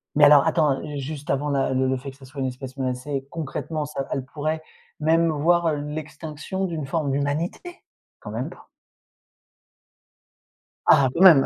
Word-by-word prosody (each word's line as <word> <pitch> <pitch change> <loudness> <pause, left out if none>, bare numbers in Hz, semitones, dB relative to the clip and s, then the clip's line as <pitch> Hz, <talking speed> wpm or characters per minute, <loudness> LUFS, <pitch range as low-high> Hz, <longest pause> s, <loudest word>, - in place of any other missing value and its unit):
Mais 150 - +5
alors, 145 0 +7
attends, 155 -4 +2
heu, 150 -1 -5
juste 145 +1 -6
avant 145 +2 0
la 135 -2 +1
le 130 0 +2
le 130 - +1
fait 135 +2 -7
que 135 - -19
ce 135 - -13
soit 135 +1 -7
une 130 - +1
espèce 130 +1 -7
menacée, 135 +1 -3
concrètement, 155 0 -3
ça 140 -2 -4
elles 130 - -2
pourraient 155 +4 -2 0.4
même 165 +2 +3
voir 165 +2 +3
l'extinction 155 +4 -4
d'une 160 -5 -3
forme 150 -2 0
d'humanité! 150 - -2 0.4
Quand - - -8
même - - -3
pas? - - -15 2.2
Ah, 140 -4 +6
quand 170 - -1
même! 165 -8 +9
145 Hz, 170 wpm, -24 LUFS, 135-160 Hz, 2.2 s, même